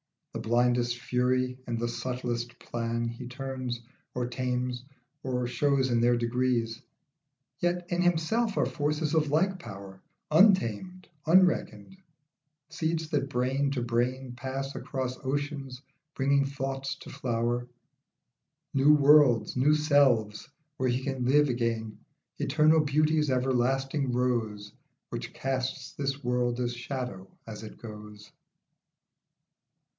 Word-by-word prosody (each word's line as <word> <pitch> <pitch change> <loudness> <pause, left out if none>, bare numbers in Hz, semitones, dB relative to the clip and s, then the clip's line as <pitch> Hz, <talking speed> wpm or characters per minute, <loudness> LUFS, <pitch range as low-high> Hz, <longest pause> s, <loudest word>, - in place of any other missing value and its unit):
The - - -4
blindest 120 0 +2
fury 125 0 0
and 120 -1 -2
the 120 +1 -1
subtlest 120 -1 -3
plan 115 0 -3
He 120 +2 -6
turns, 130 -1 -4 0.4
or 125 -1 -1
tames, 125 0 -2 0.4
or 125 -1 -1
shows 135 +1 +1
in 115 -1 +2
their 120 0 +4
degrees. 120 -1 0 0.8
Yet 175 0 0
in 175 0 +1
himself 180 +6 +1
are - - +3
forces 150 0 -1
of 155 -2 +2
like 185 +6 +1
power, 95 - -10 0.3
Untamed, 185 - +3 0.2
unreckoned; 170 - +3 0.7
seeds 160 0 -2
that 140 -2 0
brain 135 +2 0
to 130 -3 -1
brain 125 +2 -1
Pass 135 +2 -4
across 130 -2 -4
oceans 140 -1 -3 0.3
bringing 140 +1 +2
thought 135 -1 -4 0.2
to - - -10
flower, 120 -2 -1 1.1
New 140 +2 +6
worlds, 145 -4 +5
new 140 +4 +4
selves, 135 -9 +2 0.3
where 130 0 +1
he 125 +2 -1
can 135 -2 -2
live 145 +3 +4
again 115 -3 -2 0.4
Eternal 155 +2 +4
beauty's 150 0 +2
everlasting 130 +2 +1
rose 115 -5 -1 0.4
Which - - -5
casts 130 -1 -3
this 140 0 -3
world 120 0 0
as 120 -1 -1
shadow 120 -6 -5 0.2
as 110 -2 -8
it 110 - -10
goes. 105 -2 -11
130 Hz, 120 wpm, -28 LUFS, 120-145 Hz, 1.1 s, New